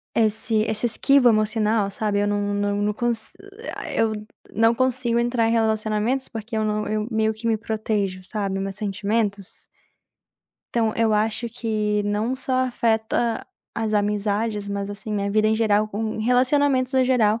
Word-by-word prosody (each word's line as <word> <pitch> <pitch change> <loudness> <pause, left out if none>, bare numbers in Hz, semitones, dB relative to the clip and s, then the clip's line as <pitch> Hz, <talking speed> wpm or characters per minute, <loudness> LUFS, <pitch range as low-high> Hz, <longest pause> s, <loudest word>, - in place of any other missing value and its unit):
esse 220 0 +1
essa 220 +2 -1
esquiva 265 +2 +4
emocional, 215 -1 +2
sabe, 205 +1 -1
eu 205 - +1
não 205 0 0
não 205 0 0
não 210 0 +1
cons 230 0 -2 0.3
eh, - - -6
ah, - - -6
eu 225 -1 +2 0.4
não 225 +2 +3
consigo 240 -1 +1
entrar 240 -1 +1
em - - +1
relacionamentos 220 +3 0
porque 225 0 -6
eu 220 - +1
não 210 0 -1
eu 215 0 -1
meio 220 0 +2
que 220 +2 -7
me 225 -1 +2
protejo, 215 -3 -2
sabe, 195 -1 -3
meus 195 0 -3
sentimentos. 205 -1 -2 1.1
Então 225 -2 +2
eu 225 -1 +2
acho 220 +2 0
que 215 -3 -1
não 210 +5 -1
só 260 0 -4
afeta 230 -1 0 0.3
as 220 -1 -2
amizades, 210 0 0
mas 200 0 -3
assim, 205 +1 -6
minha 200 -1 -1
vida 215 +1 +3
em 220 - +3
geral, 215 -1 +2
com 215 +1 -3
relacionamentos 255 +3 +2
no 260 -1 +3
geral, 230 -4 +3
220 Hz, 165 wpm, -23 LUFS, 210-230 Hz, 1.1 s, esquiva